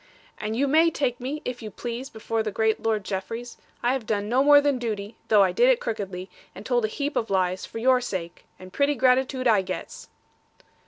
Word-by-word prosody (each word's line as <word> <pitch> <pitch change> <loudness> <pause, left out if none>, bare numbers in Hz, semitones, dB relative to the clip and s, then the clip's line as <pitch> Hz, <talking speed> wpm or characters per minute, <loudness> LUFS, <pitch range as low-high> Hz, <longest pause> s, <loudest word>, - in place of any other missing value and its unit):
'And 215 +1 -3
you 280 +4 +1
may 320 +4 +5
take 265 -6 -1
me, 275 +5 -5
if 250 -1 -4
you 220 - -6
please, 240 +5 -6
before 225 0 -3
the 220 - -2
great 220 +2 +1
Lord 220 -2 0
Jeffreys. 225 +6 -5 0.3
I 245 +2 +3
have 255 -5 -4
done 205 -1 -1
no 250 +4 +3
more 290 0 +8
than 285 -3 +1
duty, 215 -3 -4
though 210 -2 +6
I 190 - +2
did 485 +2 +4
it - - +4
crookedly, 195 - -4 0.3
and 210 - -10
told 240 -2 +1
a - - +1
heap 285 +6 -3
of 225 - -1
lies, 185 -1 0
for - - -8
your 255 +2 +3
sake. 180 -8 -5
And 185 0 -13
pretty 285 +1 +2
gratitude 255 +1 +2
I 215 -4 +5
gets.' 190 - -7
230 Hz, 215 wpm, -25 LUFS, 210-265 Hz, 0.3 s, more